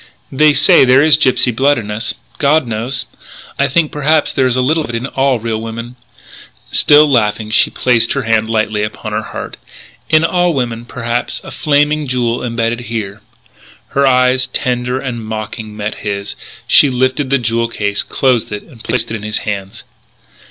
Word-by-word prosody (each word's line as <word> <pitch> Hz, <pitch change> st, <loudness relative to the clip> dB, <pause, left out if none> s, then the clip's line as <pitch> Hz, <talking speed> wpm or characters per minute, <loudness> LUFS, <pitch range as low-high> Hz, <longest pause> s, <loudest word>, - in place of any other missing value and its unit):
They 150 Hz, +2 st, +4 dB
say 145 Hz, 0 st, +5 dB
there 130 Hz, +2 st, +5 dB
is 155 Hz, -1 st, +6 dB
gypsy 125 Hz, -2 st, +2 dB
blood 140 Hz, +4 st, +3 dB
in 105 Hz, -3 st, -5 dB
us.... 110 Hz, +3 st, -3 dB, 0.2 s
God 150 Hz, 0 st, +3 dB
knows.... 120 Hz, +3 st, -3 dB, 0.5 s
I 140 Hz, -, +3 dB
think 155 Hz, +2 st, +1 dB
perhaps 150 Hz, +1 st, +1 dB
there 130 Hz, -, +2 dB
is 125 Hz, -, 0 dB
a 130 Hz, -, +1 dB
little 160 Hz, +5 st, +1 dB
of -, -, -8 dB
it 120 Hz, -, -4 dB
in 115 Hz, +2 st, -3 dB
all 135 Hz, -1 st, 0 dB
real 110 Hz, -1 st, -3 dB
women 115 Hz, +2 st, -7 dB, 0.4 s
" -, -, -16 dB, 0.3 s
Still 150 Hz, +1 st, +5 dB
laughing 110 Hz, -4 st, 0 dB
she -, -, +4 dB
placed 120 Hz, -3 st, +1 dB
her 140 Hz, -, -2 dB
hand 110 Hz, -1 st, +1 dB
lightly 110 Hz, -1 st, 0 dB
upon 105 Hz, +1 st, -5 dB
her 105 Hz, +1 st, -1 dB
heart -, -, -8 dB, 0.5 s
"In 155 Hz, 0 st, +4 dB
all 175 Hz, -1 st, +1 dB
women 120 Hz, -3 st, -3 dB
perhaps 120 Hz, 0 st, -3 dB
a -, -, -9 dB
Flaming 150 Hz, 0 st, +1 dB
Jewel 125 Hz, -2 st, -1 dB
imbedded 115 Hz, -1 st, -1 dB
here 110 Hz, -2 st, -4 dB, 0.3 s
" -, -, -26 dB
Her 140 Hz, 0 st, +2 dB
eyes, 125 Hz, 0 st, +3 dB
tender, 125 Hz, 0 st, -2 dB
and 125 Hz, -4 st, -5 dB
mocking, 110 Hz, 0 st, -6 dB
met 105 Hz, 0 st, -4 dB
his; 100 Hz, -1 st, -4 dB, 0.3 s
she 145 Hz, -, +5 dB
lifted 130 Hz, +2 st, 0 dB
the 140 Hz, -, +3 dB
jewel 115 Hz, -1 st, -1 dB
case, 105 Hz, -3 st, -2 dB
closed 125 Hz, -5 st, 0 dB
it, 105 Hz, 0 st, -5 dB
and 120 Hz, -8 st, -16 dB
placed 115 Hz, -2 st, -2 dB
it -, -, -2 dB
in 110 Hz, -, -6 dB
his 105 Hz, 0 st, -2 dB
hands. 100 Hz, -2 st, -5 dB
120 Hz, 185 wpm, -15 LUFS, 110-135 Hz, 0.5 s, is